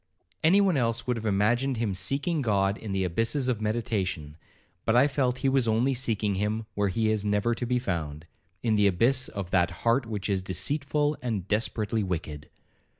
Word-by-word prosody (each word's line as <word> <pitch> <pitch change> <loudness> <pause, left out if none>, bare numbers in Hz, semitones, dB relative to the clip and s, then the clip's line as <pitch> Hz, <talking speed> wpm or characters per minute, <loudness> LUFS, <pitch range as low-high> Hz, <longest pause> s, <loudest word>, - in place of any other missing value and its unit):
Any 185 +6 +5
one 190 -6 +2
else 115 -2 0
would 125 - 0
have 110 -1 -4
imagined 120 +6 +1
him 110 -3 -1
seeking 140 - -1
God 100 -4 +1
in 110 -2 -7
the 95 0 0
abysses 115 - 0
of 120 -4 -1
meditation, 105 -9 -2 0.5
but 110 - +1
I 130 +4 +6
felt 130 -3 0
he - - +5
was 135 -3 +2
only 115 +5 +2
seeking 110 -5 0
him 105 +3 -2
where 100 0 0
he 110 +3 +1
is 110 -2 0
never 105 +3 +1
to 120 +1 -4
be 125 +1 +1
found,—in 90 +2 -4
the 105 -1 +4
abyss 120 +8 +2
of 95 -3 -6
that 90 -2 +3 0.2
heart 115 +1 +2
which 105 -3 -4
is 100 -2 0
'deceitful 145 - -1
and 110 -7 -3
desperately 110 +1 0
wicked.' 80 -6 -4
110 Hz, 185 wpm, -27 LUFS, 95-125 Hz, 0.5 s, I